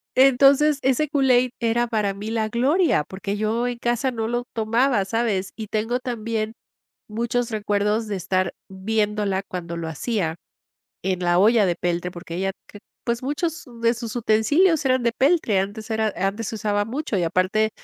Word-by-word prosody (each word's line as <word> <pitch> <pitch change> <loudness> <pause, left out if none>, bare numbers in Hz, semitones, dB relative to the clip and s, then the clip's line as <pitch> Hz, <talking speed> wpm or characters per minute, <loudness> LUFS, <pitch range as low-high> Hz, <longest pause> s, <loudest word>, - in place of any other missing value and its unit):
Entonces 275 +3 +5
ese 265 +3 +1
Kool-Aid, 255 -4 +3
era 235 +1 +1
para 210 -4 0
mí 205 +3 -6
la 220 -1 0
gloria, 270 - +2
porque 195 +2 -4
yo 220 +3 0
en 245 -1 -3
casa 240 +2 0
no 225 -2 -3
lo 240 +1 -2
tomaba, 230 +1 +2
¿sabes? 205 -2 -1
Y 220 -1 -6
tengo 225 +4 -1
también 225 -3 -3 0.5
muchos 235 +2 -1
recuerdos 210 0 0
de 205 - -2
estar 185 0 -1 0.2
viéndola, 205 0 -1
cuando 170 -2 -5
lo 165 -1 -4
hacía 160 - -2 0.7
en 185 -1 -1
la 175 0 +2
olla 215 +1 +5
de 175 - +1
peltre. 175 +1 -2
Porque 175 -1 -8
ella 195 +1 -1
cre 205 - -13 0.2
pues 235 0 -1
muchos 320 +5 -2 0.2
de 230 0 +4
sus 230 0 -6
utensilios 285 - +3
eran 255 -1 +2
de 235 -1 +1
peltre. 270 - +2
Antes 205 +4 -4
era 220 -1 0
antes 195 +4 -2
se - - -5
usaba 205 -1 0
mucho 255 +1 -3
y - - 0
aparte, 185 +6 +1
220 Hz, 170 wpm, -23 LUFS, 200-245 Hz, 0.7 s, Entonces